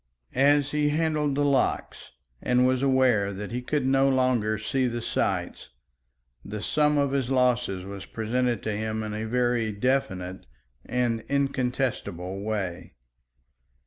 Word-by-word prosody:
As 140 +1 +3
he 150 0 +1
handled 150 -2 0
the 145 +1 +1
locks, 140 -2 0 0.3
and 125 0 +3
was 130 0 +2
aware 130 -7 +3
that 105 +3 -6
he 125 +1 -3
could 140 +2 -1
no 135 +1 +3
longer 125 -5 +2
see 125 +5 0
the 120 0 -3
sights, 115 - -2 0.7
the 105 +1 -6
sum 150 +6 +2
of 140 -1 +2
his 135 -3 0
losses 125 -7 +1
was 100 0 -8
presented 120 0 -1
to 110 - -1
him 110 +1 -2
in 105 -1 -4
a 110 +1 -3
very 120 -1 +1
definite 100 - -2 0.4
and 120 -3 0
incontestable 125 -9 -1
way. 95 - -4
125 Hz, 140 wpm, -26 LUFS, 110-135 Hz, 0.7 s, As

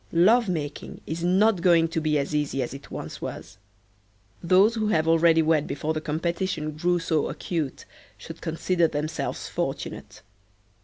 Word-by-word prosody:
Love 210 +6 +4
making 150 -5 -4
is 165 +2 -4
not 190 +2 +3
going 170 -2 +4
to 165 0 -2
be 155 -1 +1
as 140 +1 -2
easy 145 -3 0
as 120 - -6
it 135 +1 -10
once - - -7
was. - - -7 0.8
Those 185 +6 +4
who 220 -2 -1
have 160 -6 +1
already 165 0 +4
wed 155 -2 +2
before 150 +3 -2
the 155 - -3
competition 165 0 -2
grew 175 +4 0
so 160 -3 0
acute 160 -6 -4 0.3
should - - -10
consider 165 +1 +1
themselves 155 +1 -3
fortunate. - - -5
165 Hz, 155 wpm, -25 LUFS, 155-175 Hz, 0.8 s, Love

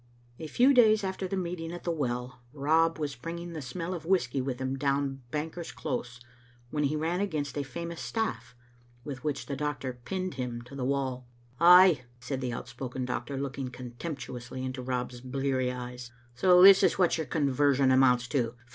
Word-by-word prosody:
A 160 - -5
few 255 - +4
days 220 -4 +5
after 190 0 -3
the 195 - -3
meeting 170 -2 -4
at 175 - -7
the 170 - -1
well, 125 -5 -3
Rob 160 +3 +2
was 145 -3 -3
bringing 170 +6 -6
the 155 - -5
smell 165 +7 -4
of 170 -4 -5
whisky 160 -8 +1
with 130 -1 -3
him 130 0 -2
down 140 0 -1
Banker's 160 +4 -4
Close 125 -3 -4 0.5
when 150 -1 0
he 145 +2 0
ran 165 +4 -1
against 155 -9 -2
a 145 - -1
famous 170 +5 -6
staff, 120 - -3 0.5
with 135 -2 -7
which 145 -3 -2
the 140 - -4
doctor 135 -3 -3
pinned 185 +2 -3
him 125 -2 -4
to 125 - -14
the 135 -2 -4
wall. 130 -2 -1 0.2
•* - - -32
Ay," 180 -3 +8 0.2
said 130 +2 -4
the 125 -1 -2
outspoken 125 +2 -5
doctor, 125 +2 -3
looking 135 -1 -4
contemptu 125 +3 -7
ously 125 +2 -6
into 130 0 -4
Rob's 125 -1 -3
bleary 130 0 -1
eyes, 125 -1 -7 0.2
"so 180 +8 +6
this 195 0 +10
is - - +3
what 175 -3 +3
your 160 - -3
conversion 140 -2 +2
amounts 125 -2 +4
to? 120 -4 0
140 Hz, 185 wpm, -29 LUFS, 125-165 Hz, 0.5 s, this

